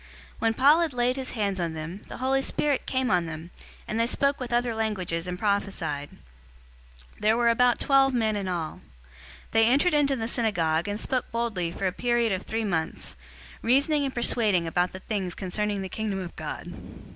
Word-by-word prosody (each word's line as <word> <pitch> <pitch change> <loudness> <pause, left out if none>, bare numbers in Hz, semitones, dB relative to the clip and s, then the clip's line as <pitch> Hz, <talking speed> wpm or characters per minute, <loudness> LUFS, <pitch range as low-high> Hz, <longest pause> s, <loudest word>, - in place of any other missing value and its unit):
019:006 60 - -20 0.3
When 225 0 +2
Paul 285 +6 +6
had 330 -4 0
laid 245 +1 +2
his 265 -1 -4
hands 200 -4 -1
on 170 -2 -1
them, 165 +5 -6
the - - -8
Holy 265 +2 +1
Spirit 285 0 0
came 260 -1 0
on 175 -2 +2
them, 165 +2 -7 0.4
and 220 - -2
they 230 - +3
spoke 280 +3 +1
with 250 -1 -5
other 240 0 +1
languages 185 -6 -2
and 180 0 -3
prophesied. 180 -8 -1
019:007 - - -18 1.0
They 215 +1 +4
were 235 0 +3
about 245 +1 +4
twelve 270 -1 +4
men 220 -4 +1
in 200 -2 -3
all. 170 -4 -3 0.7
019:008 225 - +3
He - - +6
entered 285 +7 +3
into 285 -2 +3
the 225 -3 -3
synagogue, 170 -9 +1
and 205 +1 -2
spoke 255 +1 -2
boldly 225 -7 -1
for 185 +3 -4
a 185 - +2
period 240 +2 +1
of 190 -1 -1
three 225 0 -1
months, 160 -5 -3 0.5
reasoning 285 +5 +3
and 270 -1 -3
persuading 215 -7 +2
about 175 +2 0
the 185 - -9
things 190 -5 -3
concerning 200 +1 -2
the - - -4
Kingdom 210 0 -3
of 185 -3 -6
God. - - -6
220 Hz, 200 wpm, -26 LUFS, 180-245 Hz, 1.0 s, Paul